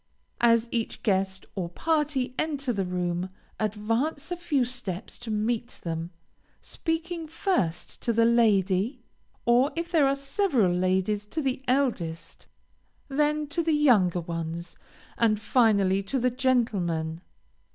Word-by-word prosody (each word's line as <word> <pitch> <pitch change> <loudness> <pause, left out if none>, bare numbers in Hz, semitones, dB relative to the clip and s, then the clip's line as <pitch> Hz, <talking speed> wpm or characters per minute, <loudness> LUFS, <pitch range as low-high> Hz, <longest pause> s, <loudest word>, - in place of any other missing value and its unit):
As 230 -1 +4
each 230 -2 -3
guest 190 -2 0
or 180 -4 -3
party 295 - 0
enter 280 -5 -1
the 195 -3 -1
room, 180 0 -2 0.3
advance 225 - -1
a - - 0
few 315 -7 0
steps 230 -6 -5
to 240 - -8
meet 220 +2 -1
them, 165 0 -3 0.5
speaking 330 0 -3
first 305 - -1
to 235 - 0
the 230 0 +3
lady, 220 0 +2 0.4
or 245 +5 +4
if 335 +1 -3
there 310 -5 +4
are 275 - +2
several 275 - +1
ladies, 190 +3 0
to 320 - -3
the 265 -3 -1
eldest, 175 - -1 0.6
then 300 +2 +1
to 335 +3 0
the 325 -1 +1
younger 205 - +4
ones, 165 0 -5 0.4
and 215 -3 +3
finally 205 -5 +3
to 200 +8 -2
the 250 0 +2
gentlemen. 195 -11 0
230 Hz, 130 wpm, -27 LUFS, 190-275 Hz, 0.6 s, As